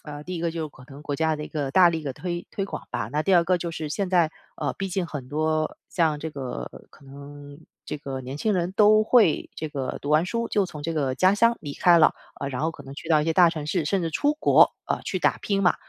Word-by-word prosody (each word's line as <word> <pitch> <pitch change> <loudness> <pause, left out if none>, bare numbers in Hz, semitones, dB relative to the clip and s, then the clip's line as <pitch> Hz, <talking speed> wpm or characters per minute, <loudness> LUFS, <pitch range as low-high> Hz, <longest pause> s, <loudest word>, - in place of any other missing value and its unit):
呃， 150 -1 -8
第 185 - -5
一 165 - -4
个 170 - 0
就 165 0 -4
是 - - -6
可 130 -3 -17
能 140 - -11
国 145 -1 -4
家 160 +1 0
的 150 - -5
一 - - -9
个 145 -3 -3
大 180 +3 +6
力 160 -2 -3
地 140 -3 -4
推 175 +3 -5
推 195 - -3
广 - - -8
吧， 105 - -3
那 150 +1 0
第 190 +1 +3
二 170 - +4
个 180 +1 +2
就 170 -1 -4
是 155 -1 -5
现 190 +4 -2
在， 170 -3 +3 0.2
呃， 145 -4 -2
毕 195 -1 -4
竟 180 -1 -2
很 135 -6 -7
多 155 +1 -1
像 160 -4 +1
这 160 +1 -5
个 130 - -6 0.2
可 - - -19
能， 145 +1 -11 0.3
这 150 - -5
个 135 -2 -6
年 130 +2 -6
轻 215 +3 +1
人 180 0 -1
都 215 +1 +5
会， 220 -8 +3
这 155 - -5
个 135 -3 -4
读 145 - -6
完 155 +3 +4
书， 230 +5 -2
就 205 - +1
从 155 -5 -8
这 165 +2 -3
个 135 -4 0
家 185 +8 +4
乡 230 +3 +4
离 145 -3 -6
开 175 -1 +5
了， 155 - +5 0.3
呃， 140 - -2
然 130 +1 -4
后 160 - +1
可 150 - -12
能 135 0 -10
去 160 - -9
到 155 -1 +5
一 - - -1
些 165 - +1
大 175 -2 +6
城 155 -3 -5
市， 165 -1 0
甚 195 +5 0
至 165 -2 -2
出 290 - +1
国， 305 - +5
呃， - - -2
去 - - -3
打 - - +2
拼 200 -1 -1
嘛。 180 - +4
160 Hz, 300 characters per minute, -25 LUFS, 145-180 Hz, 0.3 s, 大